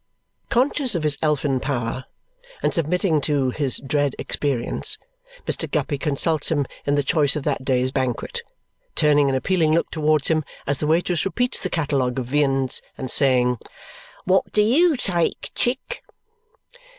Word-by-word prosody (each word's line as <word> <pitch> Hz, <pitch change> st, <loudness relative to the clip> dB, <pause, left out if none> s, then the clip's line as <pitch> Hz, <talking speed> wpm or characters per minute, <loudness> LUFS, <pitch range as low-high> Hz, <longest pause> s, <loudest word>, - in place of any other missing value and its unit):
Conscious 255 Hz, -1 st, +2 dB
of 165 Hz, -, -1 dB
his 150 Hz, -1 st, +3 dB
elfin 145 Hz, -3 st, +1 dB
power 130 Hz, -2 st, -3 dB, 0.6 s
and -, -, +1 dB
submitting 165 Hz, 0 st, +1 dB
to 140 Hz, -3 st, 0 dB
his 140 Hz, -1 st, +1 dB
dread 145 Hz, 0 st, -1 dB
experience, 135 Hz, -5 st, -1 dB, 0.5 s
Mr. -, -, -1 dB
Guppy 145 Hz, -3 st, -1 dB
consults 150 Hz, +1 st, +1 dB
him 145 Hz, -3 st, +1 dB, 0.2 s
in 145 Hz, -, +2 dB
the 145 Hz, -, +1 dB
choice 145 Hz, -1 st, +2 dB
of 150 Hz, -, -3 dB
that 140 Hz, -2 st, -2 dB
day's 130 Hz, -1 st, +1 dB
banquet, 130 Hz, -3 st, -2 dB, 0.5 s
turning 145 Hz, -2 st, +4 dB
an 135 Hz, -, 0 dB
appealing 160 Hz, +2 st, +1 dB
look 170 Hz, -, 0 dB
towards 155 Hz, -2 st, +1 dB
him 155 Hz, -1 st, +1 dB, 0.2 s
as 140 Hz, -1 st, +1 dB
the 150 Hz, -, -1 dB
waitress 170 Hz, +2 st, +1 dB
repeats 245 Hz, +6 st, -1 dB
the 185 Hz, -, -2 dB
catalogue 140 Hz, -7 st, -1 dB
of 130 Hz, -, -2 dB
viands 135 Hz, -1 st, +1 dB, 0.2 s
and 130 Hz, -2 st, -5 dB
saying 125 Hz, -3 st, +3 dB, 0.7 s
"What 190 Hz, +1 st, +2 dB
do 210 Hz, -, +3 dB
YOU 305 Hz, +9 st, +4 dB
take, 175 Hz, -8 st, -1 dB
Chick?" 265 Hz, -, -2 dB
145 Hz, 150 wpm, -22 LUFS, 135-170 Hz, 0.7 s, turning